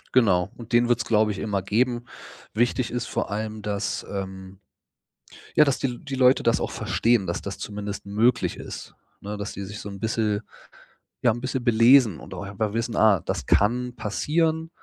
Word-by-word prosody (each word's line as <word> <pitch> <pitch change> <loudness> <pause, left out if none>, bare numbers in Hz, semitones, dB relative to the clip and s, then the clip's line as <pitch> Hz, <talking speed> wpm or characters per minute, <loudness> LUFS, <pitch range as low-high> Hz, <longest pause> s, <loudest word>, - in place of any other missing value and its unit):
Genau, 95 -6 +4
und 120 0 -11
den 120 0 +5
wird's 115 -3 +2
glaube 110 -1 +3
ich, 100 - -5
immer 100 -3 -1
geben. 120 +4 0 0.5
Wichtig 120 +2 +1
ist 125 0 -3
vor - - -2
allem, 110 0 -4
dass, 100 -1 -2
ähm, 95 -1 -6 1.0
ja, 150 - +7
dass 140 -2 +1
die 125 -3 -2
die 140 -2 -5
Leute 130 0 +4
das 115 - +2
auch - - -2
verstehen, 115 -4 +1
dass 85 - -2
das 100 - -6
zumindest 105 -1 -5
möglich 115 +4 +1
ist, - - -8 0.3
ne, 105 +1 -5
dass 100 +1 -4
die 100 - -5
sich 100 +1 -8
so - - -7
'n 100 -1 -8
bisschen 110 -1 0 0.8
ja 120 - +4
'n 115 - -4
bisschen 130 0 -3
belesen 115 - +5
und - - -10
auch - - -6
einfach 100 +1 -3
wissen, 115 0 -2
ah, 105 -5 +5
das - - -3
kann 125 +4 +2
passieren, 160 +9 0
110 Hz, 185 wpm, -25 LUFS, 100-120 Hz, 1.0 s, ja